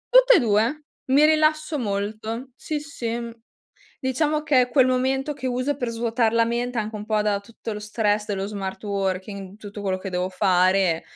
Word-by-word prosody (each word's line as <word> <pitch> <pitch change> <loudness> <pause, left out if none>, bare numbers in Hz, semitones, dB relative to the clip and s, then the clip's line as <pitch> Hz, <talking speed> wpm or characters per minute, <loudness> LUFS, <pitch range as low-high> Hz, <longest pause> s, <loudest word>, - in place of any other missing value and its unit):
Tutte - - +8
e - - +6
2. 230 +7 +1 0.2
Mi 280 +3 +5
rilasso 310 -1 +2
molto, 220 +4 -3
sì, 300 +5 -4
sì, 240 -5 -4
mh. 235 -1 -6 0.7
Diciamo 300 +3 0
che 255 -4 +3
quel 260 -2 +5
momento 265 +3 0
che 260 -2 -4
uso 255 +3 -1
per 245 -3 -2
svuotar 230 0 0
la 230 0 +4
mente, 240 +1 -2
anche 215 0 -3
un 210 0 -5
po' 215 -1 +1
da 205 -1 +1
tutto 225 +1 -8
lo 210 - -5
stress 210 0 0
dello 195 -2 -2
smart 195 -2 -5
working, 195 0 -3
tutto 205 -1 -9
quello 190 -1 -1
che 195 - -6
devo 180 0 -1
fare, 185 -2 +2
230 Hz, 185 wpm, -24 LUFS, 205-260 Hz, 0.7 s, Tutte